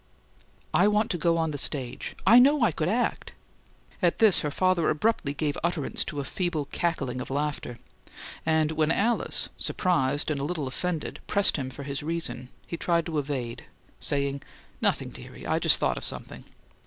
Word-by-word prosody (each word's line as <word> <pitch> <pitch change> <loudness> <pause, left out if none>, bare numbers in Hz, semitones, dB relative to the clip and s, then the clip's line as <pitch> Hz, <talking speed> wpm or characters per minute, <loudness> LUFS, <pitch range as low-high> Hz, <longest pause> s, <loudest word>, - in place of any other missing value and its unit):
"I - - +5
want 210 +1 +2
to 175 - 0
go 165 +1 +2
on 160 -1 0
the 145 - -3
stage: 130 -4 -2
I 235 - +8
know 280 +1 +5
I 225 - +4
could 155 +2 -1
act." 240 +5 -1 0.7
At 175 -3 +2
this, 220 -4 +6
her 150 - -1
father 185 +1 +2
abruptly 155 -3 +1
gave 145 -1 -1
utterance 170 -4 0
to 145 - -5
a - - -2
feeble 165 0 -2
cackling 135 -7 -2
of - - -7
laughter; 145 -3 -3 0.7
and 160 -1 +2
when 155 0 +1
Alice, 230 +7 +1
surprised 145 -5 +1
and 145 - -1
a - - -3
little 155 -1 -2
offended, 160 +4 -3
pressed 200 -1 +3
him 130 -2 -3
for 135 +2 -8
his 140 0 -3
reason, 145 -6 -1 0.2
he 170 - -5
tried 170 -1 +1
to 160 -3 -1
evade, 130 -5 -4 0.3
saying, 140 -1 -1 0.4
"Nothing, - - +1
dearie. - - -11
I - - +1
just - - +5
thought - - 0
of - - -6
something." - - -5
155 Hz, 180 wpm, -27 LUFS, 140-175 Hz, 0.7 s, I